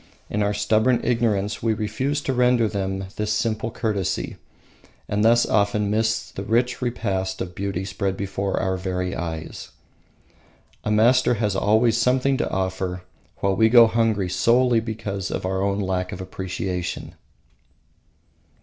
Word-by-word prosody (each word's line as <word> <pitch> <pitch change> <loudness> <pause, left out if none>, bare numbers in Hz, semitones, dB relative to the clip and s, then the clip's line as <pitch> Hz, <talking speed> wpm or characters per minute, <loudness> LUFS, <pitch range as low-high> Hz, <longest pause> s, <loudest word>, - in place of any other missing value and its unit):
In 105 - 0
our 100 0 +1
stubborn 110 +4 +2
ignorance 110 -4 0
we 110 -1 +1
refuse 120 +8 -2
to 135 - -1
render 125 -2 +3
them 95 -2 -3
this 105 0 -1
simple 110 +1 -1
courtesy, 105 -5 -2 0.7
and 105 +1 0
thus 120 +1 +5
often 105 0 +1
miss 110 +1 0
the - - -6
rich 120 +5 0
repast 95 -6 -2
of 90 - -5
beauty 95 -1 -3
spread 95 0 -2
before 100 0 -2
our 95 0 -1
very 90 -1 -3
eyes. 80 -2 -6 1.1
A - - -2
master 120 +4 +4
has 105 -3 -1
always 110 +3 +3
something 130 +3 +2
to 150 - -1
offer, 95 -1 -2 0.4
while 100 -1 +1
we 110 +3 +4
go 120 0 +8
hungry 110 -4 +1
solely 115 +6 +3
because 110 -4 -4
of - - -3
our 95 +1 -1
own 100 0 0
lack 95 -2 -2
of - - -6
appreciation. 95 -1 -4
105 Hz, 145 wpm, -23 LUFS, 95-115 Hz, 1.1 s, go